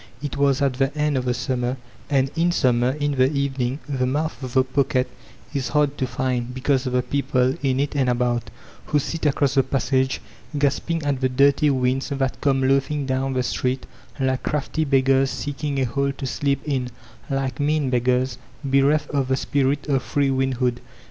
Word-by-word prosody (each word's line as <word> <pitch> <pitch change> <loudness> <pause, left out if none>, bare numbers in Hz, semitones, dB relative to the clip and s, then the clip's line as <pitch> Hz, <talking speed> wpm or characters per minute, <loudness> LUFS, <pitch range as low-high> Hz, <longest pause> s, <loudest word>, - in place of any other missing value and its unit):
It 145 0 -4
was 140 -1 +2
at 135 -2 +2
the 135 +2 0
end 150 -1 +1
of 130 -1 -1
the 125 - +1
summer; 125 0 -1 0.3
and 135 -2 +2
in 170 +1 +2
summer, 125 -6 +2
in 145 0 -1
the 130 0 +3
evening, 135 -2 -1
the 130 -3 0
mouth 150 +5 -2
of 130 -2 -6
the 130 - +5
pocket 130 0 +1 0.5
is 135 -4 -1
hard 145 +1 +1
to 130 - 0
find, 125 -1 -2
because 130 0 +1
of 125 - -2
the 125 0 +2
people, 130 -2 +1
in 135 -2 +1
it 145 +1 -1
and 135 -3 +2
about^ 120 -1 +1 0.4
who 150 - +1
sit 155 +2 -1
across 140 -1 +2
the 135 - +5
passage, 130 0 0 0.4
gasping 145 +3 0
at 140 -2 -1
the 130 - +2
dirty 140 +3 +4
winds 130 0 0
that 135 -2 -2
come 135 -2 +2
loafing 140 +2 +1
down 130 0 -1
the 130 -1 0
street 125 +1 -1 0.3
like 130 -1 0
crafty 155 +1 -1
beggars 135 -1 +3
seeking 145 0 -3
a - - +2
hole 140 +3 0
to 135 - -6
sleep 140 +1 0
in 130 -4 -1 0.2
— 115 +1 -24
^like 135 -2 -2
mean 145 -2 +1
beggars, 125 +1 +1 0.3
bereft 140 +2 +2
of 140 -3 0
the 130 0 +1
spirit 140 +2 0
of 135 -3 +2
free 140 +2 0
windhood. 130 -2 0
135 Hz, 190 wpm, -23 LUFS, 130-140 Hz, 0.5 s, the